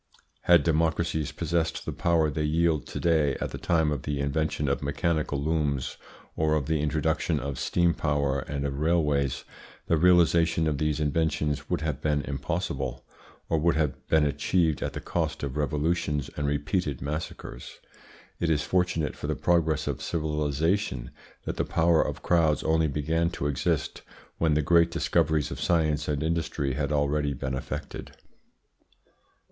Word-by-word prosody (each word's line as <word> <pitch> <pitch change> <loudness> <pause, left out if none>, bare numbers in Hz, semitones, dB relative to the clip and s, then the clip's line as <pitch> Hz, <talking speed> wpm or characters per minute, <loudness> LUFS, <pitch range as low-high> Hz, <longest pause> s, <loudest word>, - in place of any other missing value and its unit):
Had 85 -1 +6
democracies 80 -1 0
possessed 85 -1 -1
the - - -3
power 80 -3 +1
they 75 - -2
wield 80 +1 +1
to - - -5
day 80 -5 +2
at - - -3
the - - -6
time 80 -3 +2
of 70 -4 -2
the 75 +1 -3
invention 75 +1 -1
of 70 - 0
mechanical 75 0 -1
looms 75 -3 -1 0.4
or 80 0 +2
of 75 -3 0
the 80 +1 0
introduction 80 +1 0
of 70 -1 -4
steam 85 -1 +2
power 70 -3 0
and 70 +1 -4
of 70 0 -3
railways, 75 -4 +1 0.4
the 85 - +2
realisation 85 -1 +4
of 75 -3 0
these 75 -1 0
inventions 75 -1 0
would - - 0
have 75 -4 -2
been 75 -1 +1
impossible, 70 -3 -3 0.4
or 80 - +1
would 85 +2 +2
have 75 -3 -1
been 80 -2 +4
achieved 75 +2 +1
at - - -2
the - - -4
cost - - -2
of 70 -1 -3
revolutions 75 0 -1
and 75 - -1
repeated 75 0 -1
massacres. 70 -3 -6 0.6
It 85 - 0
is 75 -2 +2
fortunate 90 -5 0
for - - -6
the - - 0
progress 80 -3 +1
of - - -3
civilisation 75 - -1 0.3
that - - -4
the - - +1
power 85 -1 +3
of - - -3
crowds 80 -4 +2
only 80 0 +2
began 80 +4 0
to - - -3
exist 70 0 -1 0.4
when 80 -2 +2
the 75 - +2
great 85 +2 +4
discoveries 80 -3 +1
of - - -6
science 80 -4 +1
and 75 -1 -1
industry 80 -4 -1
had 70 +2 -2
already 75 -1 +1
been 65 +1 -4
effected. 65 - -6
75 Hz, 160 wpm, -27 LUFS, 70-80 Hz, 0.6 s, Had